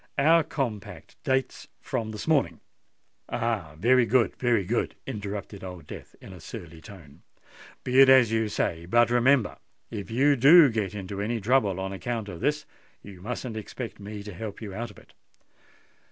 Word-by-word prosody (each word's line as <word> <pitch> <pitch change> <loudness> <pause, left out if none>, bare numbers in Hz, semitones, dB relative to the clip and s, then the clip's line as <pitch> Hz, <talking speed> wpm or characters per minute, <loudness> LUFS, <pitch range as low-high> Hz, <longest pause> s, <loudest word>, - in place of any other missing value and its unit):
Our 160 +3 +5
compact 120 -9 -5
dates 130 0 -1
from 125 -6 -3
this 110 +5 -7
morning——" 135 - +1 0.7
"Oh! 110 -10 -2
very 120 +6 +4
good—very 120 -3 +2
good!" - - -1
interrupted 100 -1 -6
Old 90 -4 -8
Death - - -11
in 95 - -12
a 90 - -11
surly 85 0 -10
tone. 85 -7 -14 0.6
"Be 130 +1 +2
it 135 -1 +8
as 130 -4 +6
you 110 -1 0
say: 85 -4 -2
but 120 +4 +3
remember—if 120 -5 0
you 140 +5 +3
do 145 +3 +7
get 105 -3 -2
into 100 0 -5
any 115 +3 -1
trouble 105 -4 +1
on 95 0 -4
account 110 +3 -4
of 85 - -8
this, 150 - -1 0.4
you 95 -3 -12
mustn't 120 +2 -5
expect 110 +2 -7
me 105 0 -8
to 105 -1 -8
help 105 +3 -7
you 105 -4 -7
out 115 +4 -5
of 105 - -16
it." - - -19
110 Hz, 165 wpm, -26 LUFS, 95-125 Hz, 0.7 s, it